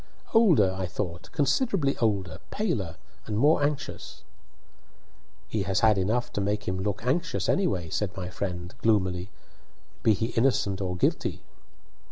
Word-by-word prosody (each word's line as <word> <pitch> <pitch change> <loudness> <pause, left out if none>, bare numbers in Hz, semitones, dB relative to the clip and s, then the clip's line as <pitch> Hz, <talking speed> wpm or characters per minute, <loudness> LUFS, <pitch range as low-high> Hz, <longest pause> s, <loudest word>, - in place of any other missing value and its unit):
"Older, 165 - +5
I 95 -1 -2
thought; 90 -1 -5
considerably 145 - +1
older, 100 -6 0
paler, 130 - -2 0.3
and 105 -2 -2
more 145 +6 +4
anxious." 145 0 -3 1.2
He 110 - -1
has 95 0 0
had 110 -3 +5
enough 115 +6 0
to 105 - -1
make 105 +1 -1
him 95 0 -1
look 105 +3 -2
anxious, 165 +8 0
anyhow, 155 - +1
"said 95 -3 -2
my 90 -1 -4
friend, 90 -1 -4
gloomily, 95 -4 +1 0.7
"be 110 - +4
he 110 - -1
innocent 115 -5 +1
or 90 -2 -2
guilty." - - 0
105 Hz, 140 wpm, -27 LUFS, 95-135 Hz, 1.2 s, Older